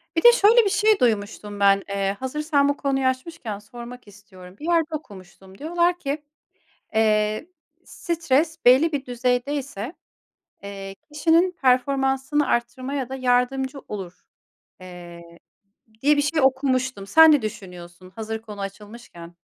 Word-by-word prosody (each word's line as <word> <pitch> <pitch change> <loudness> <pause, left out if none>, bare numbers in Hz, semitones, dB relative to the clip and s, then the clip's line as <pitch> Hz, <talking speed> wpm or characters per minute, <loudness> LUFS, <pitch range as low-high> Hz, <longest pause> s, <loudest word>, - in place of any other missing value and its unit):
Bir 330 - 0
de 480 - +10
şöyle 460 +1 +5
bir - - +2
şey 425 +1 +3
duymuştum 205 -3 -1
ben. 200 0 +4
Eee, 195 0 -2
hazırsan 285 +2 0
bu 285 - -1
konuyu 270 -2 -1
açmışken 255 -5 -4
sormak 240 +3 -11
istiyorum. 190 -2 -15
Bir 300 - -8
yerde 330 -2 +1
okumuştum 190 - -12
diyorlar 345 - 0
ki, 290 0 -4 0.7
"Eee, 215 +3 +1 0.4
stres 325 -2 -1
belli 265 +7 +6
bir 285 -3 -3
düzeyde 245 +2 -1
ise, 270 -2 -5 0.7
eee, 195 -1 -8 0.2
kişinin 330 +4 +3
performansını 270 +1 +1
arttırmaya 255 +3 -2
da 265 - -6
yardımcı 260 +2 0
olur." 185 -4 -8 0.6
eee, 175 -2 -11 0.8
diye 295 +2 +4
bir 290 - +2
şey 305 +2 0
okumuştum. 260 -5 0
Sen 320 +6 +7
ne 290 -5 +3
düşünüyorsun 185 -4 -9
hazır 220 0 -5
konu 210 -2 -10
açılmışken? 195 -3 -10
255 Hz, 130 wpm, -23 LUFS, 205-295 Hz, 0.8 s, de